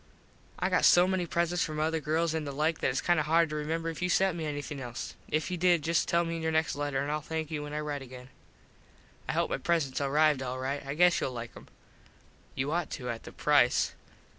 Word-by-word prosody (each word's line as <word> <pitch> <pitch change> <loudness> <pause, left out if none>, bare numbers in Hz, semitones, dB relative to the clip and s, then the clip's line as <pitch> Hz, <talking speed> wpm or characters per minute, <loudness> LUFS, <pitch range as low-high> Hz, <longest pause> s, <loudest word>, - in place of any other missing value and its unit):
I - - 0
got - - +2
so 175 0 +7
many 185 -2 0
presents 170 +1 0
from 155 -1 -4
other 160 +1 +1
girls 160 +2 0
an 160 -1 -1
the 145 - -4
like 155 +3 0
that - - +1
its - - -1
kind 175 -2 +2
of 150 - -1
hard 165 +1 +4
to - - -3
remember 160 +2 -2
if 165 +1 -5
you 180 - 0
sent 190 0 +3
me 160 -2 -3
anything 145 -1 -5
else. 120 -1 -6 0.2
If 155 +4 -1
you 180 - -1
did 175 -2 +3
just 165 0 +1
tell 170 0 +2
me 165 0 -3
in - - -5
your 160 0 0
next 160 0 +1
letter 145 -2 -1
and 145 - -2
Ill 150 0 -1
thank 160 +1 -4
you 150 -2 -2
when 150 0 -7
I 150 - -2
rite 145 -2 -4
again. 125 -1 -11 1.0
I - - +1
hope - - 0
my - - -1
presents 145 -6 0
arrived 145 0 +3
all 130 0 -3
right. 135 +2 -3
I 140 +1 -5
guess 175 +2 +4
you'll 130 - -2
like 120 -1 -6
em. - - -13 0.9
You 135 +3 -1
ought 170 +1 -1
to 125 -4 -4
at 115 - -8
the - - -8
price. 145 -4 +3
155 Hz, 250 wpm, -29 LUFS, 140-165 Hz, 1.0 s, so